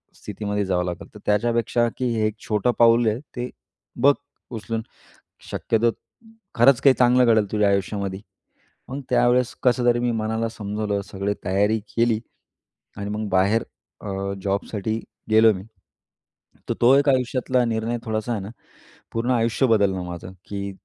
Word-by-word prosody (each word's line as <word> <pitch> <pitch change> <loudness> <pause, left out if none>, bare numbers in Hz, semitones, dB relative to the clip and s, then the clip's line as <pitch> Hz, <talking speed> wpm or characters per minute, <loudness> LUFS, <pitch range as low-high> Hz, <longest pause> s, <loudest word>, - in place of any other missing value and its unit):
स्थितीमध्ये 105 0 -3
जावं 90 -2 0
लागेल. 85 -1 -5
तर - - -10
त्याच्यापेक्षा 115 +2 +1
की 130 - -2
हे 110 -1 +1
एक 110 0 -5
छोटं 105 +2 +1
पाऊल 115 0 +5
आहे, 110 +2 0 0.2
ते 125 0 -3 0.5
बघ 140 +2 +6 0.4
उचलून, 115 0 -4 0.7
शक्यतो 115 +1 +1 0.6
खरंच 125 +2 +5
काही 135 -2 +6
चांगलं 125 0 +5
घडेल 110 -4 +3
तुझ्या 105 -2 +3
आयुष्यामध्ये." 100 0 -2 0.7
मग 135 +3 -5
त्यावेळेस 125 0 +3
कसं 125 -1 +3
तरी 120 0 +3
मी 120 0 0
मनाला 110 0 -1
समजवलं, 105 -1 -3
सगळी 100 +1 -1
तयारी 105 +4 +2 0.2
केली 115 -2 +2 0.8
आणि 100 0 -4
मग 105 +1 -3
बाहेर 100 +4 +2 0.4
अ, 100 -1 -3
जॉबसाठी 100 +2 -2 0.3
गेलो 110 +1 +6
मी. 95 -1 -7 1.1
तर - - +2
तो 125 +3 +6
एक 140 +1 +3
आयुष्यातला 130 -1 +1
निर्णय 115 +1 -1
थोडासा 110 +1 -2
आहे 110 - -1
ना, 95 - -7 0.6
पूर्ण 120 +3 0
आयुष्य 115 +2 +2
बदललं 100 -5 +2
माझं 90 +1 -8 0.2
की 100 -1 -4
110 Hz, 145 wpm, -23 LUFS, 100-120 Hz, 1.1 s, बघ